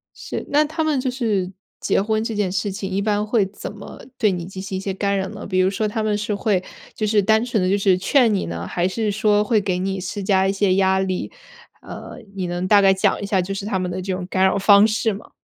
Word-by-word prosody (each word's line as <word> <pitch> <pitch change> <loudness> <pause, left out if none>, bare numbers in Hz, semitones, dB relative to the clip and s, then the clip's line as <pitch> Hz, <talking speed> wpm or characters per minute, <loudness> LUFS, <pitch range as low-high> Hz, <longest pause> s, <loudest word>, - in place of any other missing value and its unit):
是， - - -6
那 295 +1 +3
他 315 +2 -3
们 305 -4 +1
就 255 0 -1
是 215 -8 -1 0.3
结 - - +1
婚 220 +1 0
这 225 -1 -3
件 205 -3 0
事 195 +2 -1
情， 195 -1 -5
一 195 - -1
般 210 0 0
会 215 -2 +1
怎 195 0 -8
么 205 -1 -11 0.2
对 210 -4 +3
你 175 -2 -4
进 190 +1 -8
行 195 -1 -5
一 - - -3
些 195 0 -3
干 200 +1 -1
扰 190 0 -2
呢？ 210 +1 -8
比 185 -1 -1
如 185 +1 +3
说 215 +2 -1
他 215 +1 -2
们 210 -1 0
是 210 0 -2
会， 200 -2 0 0.3
就 215 - -2
是 210 -1 +3
单 220 +3 +3
纯 225 -6 0
地 185 - +1
就 200 - +2
是 195 -2 +3
劝 230 +4 +3
你 195 - -1
呢， 85 +1 -5
还 175 - -1
是 215 +2 -1
说 210 0 +2
会 220 -1 +2
给 185 -2 -1
你 190 +1 -2
施 195 +2 -5
加 190 -1 +2
一 - - +1
些 195 -1 +2
压 190 0 +3
力？ 185 -1 -2 0.5
呃， - - -9 0.2
你 185 -2 -2
能 175 +1 -3
大 205 -1 +6
概 195 -1 +5
讲 190 - +1
一 - - -3
下 195 -2 +1
就 195 +2 -3
是 195 - -5
他 200 -2 -1
们 180 -1 -2
的 185 +1 -4
这 190 0 -3
种 180 -1 -4
干 190 0 +1
扰 190 - +3
方 200 +1 +6
式 220 0 0
吗？ 200 - -11
200 Hz, 290 characters per minute, -21 LUFS, 190-215 Hz, 0.5 s, 大